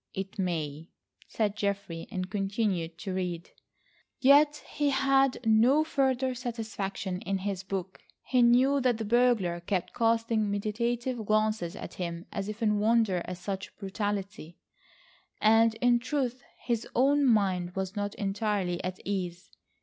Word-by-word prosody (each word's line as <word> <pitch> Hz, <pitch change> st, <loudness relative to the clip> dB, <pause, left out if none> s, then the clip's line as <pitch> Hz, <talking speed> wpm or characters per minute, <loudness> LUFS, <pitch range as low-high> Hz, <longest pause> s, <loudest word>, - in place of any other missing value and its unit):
"It 195 Hz, +1 st, -5 dB
may," 160 Hz, -3 st, -3 dB, 0.4 s
said 210 Hz, -2 st, -1 dB
Geoffrey, 200 Hz, -5 st, -3 dB
and 185 Hz, -1 st, -3 dB
continued 195 Hz, -4 st, -1 dB
to 190 Hz, +1 st, -5 dB
read. 180 Hz, -2 st, -3 dB, 0.7 s
Yet 290 Hz, +2 st, +5 dB
he 290 Hz, -1 st, 0 dB
had 270 Hz, -1 st, +3 dB
no 235 Hz, +7 st, +5 dB
further 265 Hz, -4 st, +1 dB
satisfaction 220 Hz, -6 st, -4 dB
in 195 Hz, 0 st, -1 dB
his 190 Hz, -1 st, -3 dB
book. 190 Hz, -1 st, -5 dB, 0.2 s
He 255 Hz, -1 st, +2 dB
knew 255 Hz, +4 st, +4 dB
that 245 Hz, -3 st, +2 dB
the 220 Hz, -, -4 dB
burglar 225 Hz, -6 st, +2 dB
kept 180 Hz, +1 st, -2 dB
casting 225 Hz, -2 st, +1 dB
meditative 235 Hz, +4 st, -2 dB
glances 215 Hz, -4 st, 0 dB
at -, -, -8 dB
him 170 Hz, -1 st, -5 dB
as 200 Hz, 0 st, -4 dB
if 215 Hz, +2 st, -5 dB
in 210 Hz, -1 st, +2 dB
wonder 215 Hz, -4 st, +2 dB
at 180 Hz, -, -6 dB
such 190 Hz, +2 st, -6 dB
brutality, 200 Hz, -4 st, -4 dB, 0.8 s
and 225 Hz, +1 st, +4 dB
in 240 Hz, +1 st, +3 dB
truth, 255 Hz, -1 st, -2 dB, 0.2 s
his 235 Hz, -2 st, -1 dB
own 285 Hz, +3 st, +4 dB
mind 190 Hz, -7 st, +2 dB
was 190 Hz, -1 st, -3 dB
not 205 Hz, -1 st, -3 dB
entirely 195 Hz, -3 st, -1 dB
at 185 Hz, 0 st, -3 dB
ease. 180 Hz, -3 st, -4 dB
210 Hz, 140 wpm, -29 LUFS, 190-240 Hz, 0.8 s, Yet